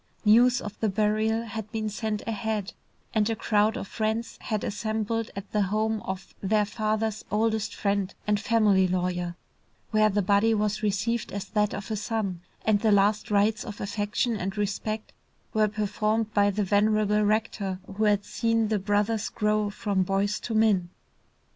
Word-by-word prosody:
News 245 Hz, +4 st, +5 dB
of 210 Hz, 0 st, -8 dB
the 220 Hz, -, +1 dB
burial 215 Hz, +2 st, +1 dB
had 220 Hz, -2 st, -6 dB
been 220 Hz, -1 st, -2 dB
sent 215 Hz, 0 st, -3 dB
ahead, 220 Hz, -3 st, -2 dB, 0.4 s
and 215 Hz, 0 st, +2 dB
a 225 Hz, -, 0 dB
crowd 215 Hz, +2 st, +2 dB
of 195 Hz, -, -5 dB
friends 220 Hz, +2 st, -2 dB
had 215 Hz, -3 st, -2 dB
assembled 220 Hz, +1 st, -2 dB
at 200 Hz, 0 st, -7 dB
the 210 Hz, -, +1 dB
home 215 Hz, +2 st, 0 dB
of 190 Hz, 0 st, -6 dB
their 210 Hz, +1 st, +2 dB
father's 215 Hz, 0 st, -1 dB
oldest 220 Hz, 0 st, 0 dB
friend 200 Hz, -2 st, -1 dB
and 210 Hz, -1 st, +2 dB
family 205 Hz, -3 st, +3 dB
lawyer, 180 Hz, -1 st, -1 dB, 0.6 s
where 215 Hz, -1 st, +4 dB
the 205 Hz, 0 st, +1 dB
body 205 Hz, +4 st, +3 dB
was 210 Hz, 0 st, 0 dB
received 215 Hz, +3 st, -1 dB
as 200 Hz, -1 st, -4 dB
that 210 Hz, -1 st, +1 dB
of 200 Hz, +3 st, -6 dB
a -, -, 0 dB
son, 205 Hz, -4 st, -2 dB, 0.2 s
and 215 Hz, -2 st, +3 dB
the 220 Hz, 0 st, +2 dB
last 205 Hz, +1 st, +3 dB
rites 210 Hz, +1 st, +2 dB
of 210 Hz, -3 st, -8 dB
affection 205 Hz, +3 st, -1 dB
and 195 Hz, +2 st, -4 dB
respect 210 Hz, +2 st, -3 dB, 0.4 s
were 215 Hz, -1 st, +3 dB
performed 215 Hz, +1 st, -1 dB
by 205 Hz, -1 st, +4 dB
the 205 Hz, +1 st, 0 dB
venerable 210 Hz, +1 st, +2 dB
rector 210 Hz, -2 st, 0 dB
who 200 Hz, +3 st, -2 dB
had 205 Hz, -1 st, +2 dB
seen 230 Hz, -2 st, 0 dB
the 215 Hz, -2 st, +1 dB
brothers 205 Hz, +2 st, 0 dB
grow 210 Hz, -1 st, 0 dB
from 205 Hz, -1 st, -1 dB
boys 195 Hz, +2 st, 0 dB
to 225 Hz, -, -4 dB
men. 205 Hz, -5 st, +3 dB
210 Hz, 165 wpm, -27 LUFS, 205-220 Hz, 0.6 s, News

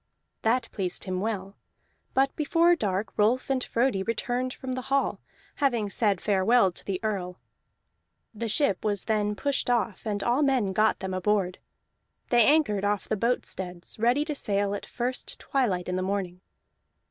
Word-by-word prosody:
That 230 Hz, +2 st, +1 dB
pleased 185 Hz, -3 st, -1 dB
him 185 Hz, -1 st, -2 dB
well. 200 Hz, -2 st, -3 dB, 0.6 s
But 270 Hz, +1 st, +2 dB
before 335 Hz, +3 st, +3 dB
dark 205 Hz, -, -2 dB
Rolf 240 Hz, +6 st, +2 dB
and 260 Hz, -2 st, +1 dB
Frodi 230 Hz, -4 st, +1 dB
returned 245 Hz, +4 st, -1 dB
from 260 Hz, 0 st, -6 dB
the 255 Hz, 0 st, -2 dB
hall, 275 Hz, 0 st, +1 dB, 0.4 s
having 235 Hz, -8 st, +1 dB
said 205 Hz, -4 st, +1 dB
farewell 205 Hz, +1 st, +3 dB
to -, -, -8 dB
the 190 Hz, -2 st, -3 dB
Earl. 185 Hz, -4 st, -3 dB, 0.9 s
The 225 Hz, +1 st, -4 dB
ship 245 Hz, -2 st, +1 dB
was 205 Hz, -3 st, 0 dB
then 210 Hz, -1 st, 0 dB
pushed 280 Hz, +1 st, -1 dB
off, 230 Hz, -5 st, 0 dB
and 205 Hz, -2 st, -2 dB
all 245 Hz, +4 st, +2 dB
men 255 Hz, -9 st, +2 dB
got 215 Hz, +3 st, +2 dB
them 190 Hz, 0 st, -3 dB
aboard; 185 Hz, -1 st, 0 dB, 0.7 s
they 240 Hz, -1 st, +6 dB
anchored 280 Hz, -8 st, +3 dB
off 205 Hz, 0 st, 0 dB
the 215 Hz, -, 0 dB
boat 235 Hz, +4 st, 0 dB
steads, 180 Hz, +1 st, -7 dB
ready 245 Hz, +6 st, +3 dB
to 305 Hz, -, -2 dB
sail 200 Hz, -6 st, 0 dB
at 205 Hz, -, -5 dB
first 250 Hz, +1 st, -3 dB
twilight 205 Hz, -10 st, 0 dB
in 180 Hz, 0 st, -1 dB
the -, -, -1 dB
morning. 185 Hz, -2 st, -2 dB
215 Hz, 165 wpm, -27 LUFS, 195-255 Hz, 0.9 s, they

